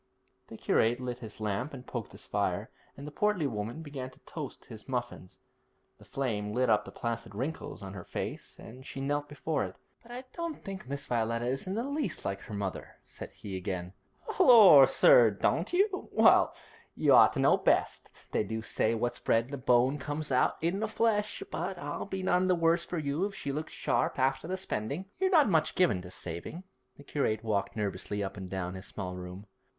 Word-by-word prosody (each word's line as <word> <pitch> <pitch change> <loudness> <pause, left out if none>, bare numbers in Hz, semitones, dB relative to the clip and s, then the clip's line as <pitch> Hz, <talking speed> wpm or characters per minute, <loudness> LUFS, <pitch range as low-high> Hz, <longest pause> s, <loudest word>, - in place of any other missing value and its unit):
"' - - -43
The - - -10
curate 120 +2 +2
lit 125 -1 -4
his 110 -3 -10
lamp 110 +7 -2
and 125 -1 -10
poked 120 -5 -6
his - - -11
fire, - - -1 0.3
and 140 - -8
the 150 - -7
portly 210 -1 +1
woman 115 +5 -4
began 140 -4 -6
to - - -20
toast - - -8
his 110 +3 -12
muffins. 120 -7 -4 0.6
The - - -16
flame 105 -6 -2
lit 125 -2 +2
up 105 - +3
the - - -9
placid 115 -2 -4
wrinkles 135 -1 -4
of 95 0 -7
her 95 -3 -7
face - - -6
as 125 +4 -11
she - - -6
knelt 145 +1 -1
before 150 +2 -2
it: - - -6 0.3
'But 240 - -15
I 250 +1 -6
don't 335 -2 -4
think 190 -8 -7
Miss 140 +1 -4
Violetta 115 0 -1
is 135 +7 -2
in 190 - -2
the 230 - -1
least 280 - -3
like 100 0 -2
her - - -9
mother,' 100 -2 -5
said - - -9
he 100 -2 -8
again. 90 -1 -4 0.5
'Lor' 195 - +9
sir, 120 -2 +7
don't 135 - 0
you? 380 +2 +1
Well, - - +5 0.4
you - - +4
ought - - +7
to - - -3
know - - +5
best. - - +1 0.2
They - - +1
do 110 0 -4
say 110 +1 0
what's 120 +2 -2
bred 115 +1 +2
in 130 - -15
the 140 - -3
bone 125 +2 +3
comes 145 +2 -3
out 130 0 +2
in 175 +4 +1
the 220 - -1
flesh; 215 -1 0
but - - -3
it'll - - -5
be 190 -1 -4
none 185 0 +2
the 185 - +4
worse 165 0 +2
for 175 - -4
you 150 +4 -1
if 200 -1 -5
she 140 -7 -4
looks 155 +3 -4
sharp - - 0
after 135 +3 +1
the 185 +1 -2
spending. 145 - -3
You're 380 0 +2
not 315 -7 +5
much 160 -6 +2
given 110 - +3
to 90 - -10
saving.' 90 - -6 0.3
The 145 - -13
curate 115 -7 -1
walked 100 -3 -1
nervously 105 -1 -3
up 95 - -5
and 95 -2 -7
down 90 -1 -3
his 95 0 -8
small 90 -3 -5
room. 90 +2 -8
130 Hz, 210 wpm, -30 LUFS, 110-170 Hz, 0.6 s, Lor